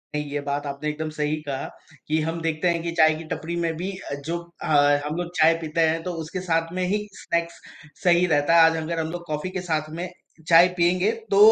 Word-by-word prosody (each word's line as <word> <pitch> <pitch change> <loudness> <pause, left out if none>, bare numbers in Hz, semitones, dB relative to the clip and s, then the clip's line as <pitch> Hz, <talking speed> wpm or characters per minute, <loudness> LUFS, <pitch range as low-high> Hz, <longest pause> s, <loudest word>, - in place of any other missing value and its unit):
नहीं, 150 0 -1
ये 145 - -1
बात 145 0 -3
आपने 140 +2 -3
एकदम 155 +1 -4
सही 150 +1 0
कहा, 135 -1 -3 0.4
कि 155 +1 +1
हम 165 +2 -3
देखते 165 +1 0
हैं 170 -1 0
कि 170 - -2
चाय 155 0 +6
की 160 - -7
टपरी 170 +2 -5
में 165 -1 -1
भी 185 +4 -3
अ, 165 - -7
जो 170 +2 -1 0.2
अ, - - -4 0.4
हम 150 - -3
लोग 175 0 -3
चाय 160 +1 +6
पीते 160 +1 -1
हैं 165 +1 -1
तो 180 - -3
उसके 180 +4 -5
साथ 165 -2 0
में 185 - -1
ही 210 0 -1
स्नैक्स 170 0 -3 0.4
सही 175 -1 +5
रहता 150 0 +3
है। 165 - +8
आज 165 - -2
अगर 160 +1 -3
हम 160 0 -2
लोग 175 0 -6
कॉफ़ी 155 +4 -3
के 185 -1 -4
साथ 155 -3 -2
में 180 - -3 0.4
चाय 170 +1 +8
पिएँगे 180 +4 +3 0.2
तो, 195 - +3
165 Hz, 235 wpm, -24 LUFS, 155-175 Hz, 0.4 s, है